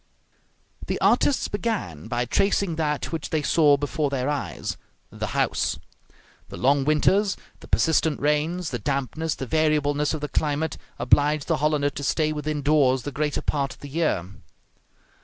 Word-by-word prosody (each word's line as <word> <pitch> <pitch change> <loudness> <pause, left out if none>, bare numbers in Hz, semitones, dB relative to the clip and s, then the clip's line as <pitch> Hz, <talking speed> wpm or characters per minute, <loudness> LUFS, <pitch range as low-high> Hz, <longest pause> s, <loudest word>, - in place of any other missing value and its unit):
The - - -2
artists 280 - +3
began 205 - -3
by 120 +1 -1
tracing 195 - +1
that 150 -2 -1
which 165 -3 -4
they 155 -2 0
saw 150 -3 +4
before 145 +1 -1
their 135 0 -1
eyes 145 -3 -3 0.4
the - - -4
house. - - +1 0.7
The - - -8
long 135 +2 +2
winters, 190 +7 +2 0.2
the - - -13
persistent 160 -2 +2
rains, 155 +4 0
the 120 - -3
dampness, 140 +6 -2
the 135 - -5
variableness 150 0 +1
of 155 - -6
the 150 - -2
climate, 150 +1 -1 0.2
obliged 145 0 +3
the - - +1
Hollander 150 -1 +1
to 145 - -6
stay 155 +2 +1
within 150 -1 -3
doors 135 -4 +3
the 145 - -4
greater 150 +1 -2
part 140 -2 -1
of - - -27
the 145 - -8
year. 155 - 0
150 Hz, 160 wpm, -24 LUFS, 140-155 Hz, 0.7 s, saw